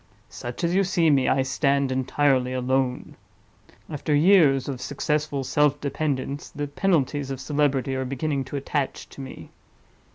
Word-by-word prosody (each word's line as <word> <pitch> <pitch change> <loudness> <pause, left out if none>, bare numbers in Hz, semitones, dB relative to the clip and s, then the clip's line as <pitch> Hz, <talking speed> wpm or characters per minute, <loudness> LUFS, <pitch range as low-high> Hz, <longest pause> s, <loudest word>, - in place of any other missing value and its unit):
Such 120 +8 -7
as 170 +1 +1
you 195 +2 +3
see 170 -4 +2
me, 135 -2 +3
I 135 - +2
stand 140 0 +1
entirely 130 0 +1
alone. 130 0 -1 0.7
After 150 0 -1
years 150 -5 +5
of 130 -3 -4
successful 145 +1 -2
self 145 +2 +2
dependence, 140 -1 -3
the 145 -1 -4
penalties 145 -3 0
of 135 -2 -4
celebrity 140 -2 0
are 130 - -1
beginning 135 +1 -2
to 135 - -7
attach 140 0 -3
to - - -10
me. 130 - -10
140 Hz, 150 wpm, -24 LUFS, 130-150 Hz, 0.7 s, years